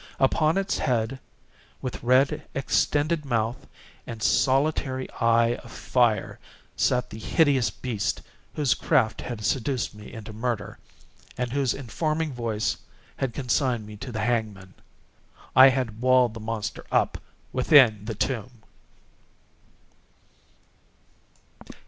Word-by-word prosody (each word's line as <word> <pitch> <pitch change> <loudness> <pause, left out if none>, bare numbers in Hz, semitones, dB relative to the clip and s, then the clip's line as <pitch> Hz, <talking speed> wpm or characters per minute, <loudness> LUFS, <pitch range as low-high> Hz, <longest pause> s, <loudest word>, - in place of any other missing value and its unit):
Upon 155 +5 +3
its 195 0 -1
head, 120 +1 -1 0.6
with 130 - -5
red 130 +3 +3
extended 150 +3 +1
mouth 120 -2 -2 0.4
and 115 -2 -6
solitary 135 0 +1
eye 115 0 +3
of 120 - -13
fire, 115 -6 0 0.4
sat 125 0 +1
the 110 - -8
hideous 135 - +2
beast 110 -6 -3 0.3
whose 140 -5 +2
craft 110 -3 +1
had 110 -4 -5
seduced 130 -2 -1
me 105 0 -12
into 110 -1 -9
murder, 115 -1 -3 0.6
and 125 -1 -2
whose 135 -2 0
informing 155 +4 -2
voice 115 -3 -2 0.4
had 130 -4 -2
consigned 125 -3 0
me 105 0 -10
to 125 - -7
the 110 -2 -3
hangman. 105 -5 -2 0.8
I 130 +1 +10
had 125 -4 -2
walled 130 -2 +4
the 115 - -8
monster 110 -1 -4
up - - +1 0.3
within 125 -6 +5
the 110 -1 -4
tomb! 120 0 -3
125 Hz, 115 wpm, -25 LUFS, 110-135 Hz, 0.8 s, I